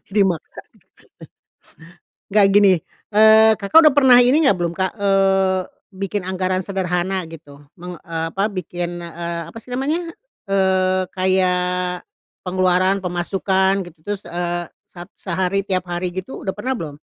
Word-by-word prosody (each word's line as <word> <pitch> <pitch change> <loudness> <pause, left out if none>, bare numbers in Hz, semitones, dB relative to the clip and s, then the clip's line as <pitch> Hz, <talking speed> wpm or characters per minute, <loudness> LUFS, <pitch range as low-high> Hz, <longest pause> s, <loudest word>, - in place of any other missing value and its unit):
Dimakan. 190 -6 -1 1.7
Nggak 205 -1 +5
gini, 205 -1 +6 0.4
eee, 220 +1 +6
Kakak 215 +12 +5
udah 305 -3 +6
pernah 265 -4 +6
ini 260 +5 +3
enggak 200 - +3
belum, 170 -1 -1
Kak, 190 0 -1
eee, 195 -2 +2 0.3
bikin 195 0 -4
anggaran 185 0 -2
sederhana 185 -1 -2
gitu, 145 -3 -14
men 180 -1 -9
eee, 165 -1 -4
apa, 195 +2 0
bikin, 175 -2 -5
eee, 170 0 -5
apa - - -12
sih 240 - -18
namanya, 310 +7 -2 0.4
eee, 185 -1 +1
kayak 180 -1 0 0.4
pengeluaran 185 +1 +1
pemasukan, 190 +2 0
gitu, 165 -1 -15
terus, 205 +1 -5
eee, 175 0 -3 0.2
se 175 - -12 0.2
sehari 190 +1 -2
tiap 185 -2 -2
hari 175 0 -3
gitu, 185 +7 -7
udah 190 - -2
pernah 260 0 -3
belum? 150 -6 -7
185 Hz, 135 wpm, -20 LUFS, 175-195 Hz, 1.7 s, gini